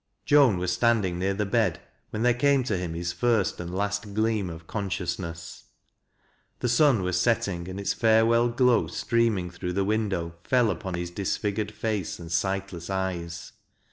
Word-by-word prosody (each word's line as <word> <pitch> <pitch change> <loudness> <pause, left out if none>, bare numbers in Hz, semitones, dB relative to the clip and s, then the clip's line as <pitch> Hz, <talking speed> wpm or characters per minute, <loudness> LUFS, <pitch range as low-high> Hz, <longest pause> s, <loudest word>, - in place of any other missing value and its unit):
Joan 140 -9 +5
was 90 0 -1
standing 100 -5 +1
near 95 +1 0
the 105 +1 -1
bed 100 - +1 0.3
when 110 - -3
there 125 0 +4
came 140 +2 +3
to 120 - -2
hiin 90 -3 -2
laiB 85 0 -3
first 110 +2 +1
and 90 0 -5
last 100 +1 -2
gleam 110 -3 +1
of 80 -1 -9
cousciousuess. 85 -4 -4 0.9
The 125 - -1
sun 120 -4 +4
was 90 0 0
aeltiug 90 -4 0
and 95 +1 -6
its 100 - 0
farewell 115 +1 +4
glow 120 0 +3
streaming 115 -7 0
through 90 +1 -4
the 100 +1 0
windo\» 100 -6 -1
fell 125 -4 +3
upon 90 +1 -4
his 85 0 -4
disfigured 100 +2 -2
face 105 -4 -3
and 85 -1 -10
sightless 95 0 -2
eyes. 90 -3 -4
100 Hz, 165 wpm, -26 LUFS, 90-115 Hz, 0.9 s, Joan